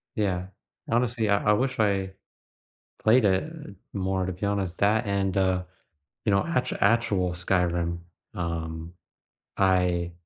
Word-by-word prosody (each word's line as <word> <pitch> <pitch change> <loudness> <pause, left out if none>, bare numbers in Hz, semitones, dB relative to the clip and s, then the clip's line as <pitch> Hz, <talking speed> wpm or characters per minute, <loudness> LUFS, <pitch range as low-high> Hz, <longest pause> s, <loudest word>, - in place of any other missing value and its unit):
Yeah. 95 -4 -1 0.4
Honestly, 115 -2 +1
I 100 +1 +3
I - - +6
wish 130 +3 0
I 100 -3 +1 0.9
played 115 +1 +5
it 100 - +1 0.4
more, 95 -1 -1
to 95 - -2
be 95 +3 -4
honest, 100 -3 -1
that 105 +2 +3
and, 100 -1 0
uh, 95 -1 +2 0.6
you - - +3
know, 100 +6 +3
act 165 -6 0
actual 100 -4 +2
Skyrim, 85 -1 0 0.3
um, 85 -1 -4 0.6
I 90 -2 +2
95 Hz, 130 wpm, -26 LUFS, 90-105 Hz, 0.9 s, I